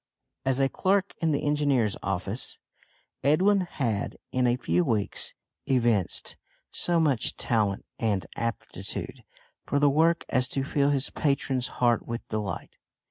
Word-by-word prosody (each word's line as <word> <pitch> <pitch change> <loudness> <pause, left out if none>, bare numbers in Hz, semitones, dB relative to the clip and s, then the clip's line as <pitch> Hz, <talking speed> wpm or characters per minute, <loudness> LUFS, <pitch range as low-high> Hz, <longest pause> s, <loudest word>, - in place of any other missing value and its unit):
As 135 0 +2
a 135 - +4
clerk 195 +6 +1
in 165 -1 +2
the 145 - 0
Engineers' 140 -8 +2
office, 100 +4 -3 0.7
Edwin 190 +8 +4
had, 115 -8 -2
in 125 -1 +2
a 120 - +3
few 90 -7 +1
weeks, 105 +1 -1 0.3
evinced 120 -8 +1 0.3
so 175 -1 +2
much 145 -8 +1
talent 105 -4 0
and 100 -6 0
aptitude 115 -1 -5 0.4
for 145 - +1
the 145 0 +4
work 165 +3 +3
as 130 -1 +2
to 135 +1 -1
fill 140 0 +1
his 140 -1 0
patron's 135 -3 0
heart 120 -2 +2
with 115 0 -5
delight. 105 -5 -4
130 Hz, 135 wpm, -27 LUFS, 110-145 Hz, 0.7 s, a